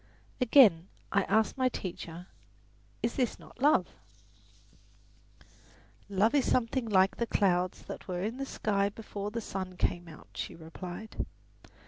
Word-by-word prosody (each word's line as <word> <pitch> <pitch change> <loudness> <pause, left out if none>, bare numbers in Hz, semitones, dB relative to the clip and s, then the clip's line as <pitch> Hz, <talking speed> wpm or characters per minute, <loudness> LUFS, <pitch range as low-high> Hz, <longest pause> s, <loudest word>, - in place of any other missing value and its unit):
Again 220 - +6 0.2
I 200 -1 +3
asked 220 +6 +2
my 255 0 +4
teacher, 175 -5 -6 0.8
"Is 230 - +1
this 250 -4 +1
not - - -16
love?" 295 +2 +5 2.2
"Love 205 +4 +3
is 280 -3 +2
something 235 -1 +1
like 190 -1 +4
the 235 - -1
clouds 185 -4 +1
that - - -8
were 180 -1 -2
in 225 +4 -2
the 275 - -3
sky 200 -4 0
before 205 -1 -6
the 230 +2 -4
sun 185 -3 -5
came 175 0 0
out," 160 -2 -13
she - - -5
replied. 175 +5 -6
200 Hz, 135 wpm, -31 LUFS, 180-230 Hz, 2.2 s, Again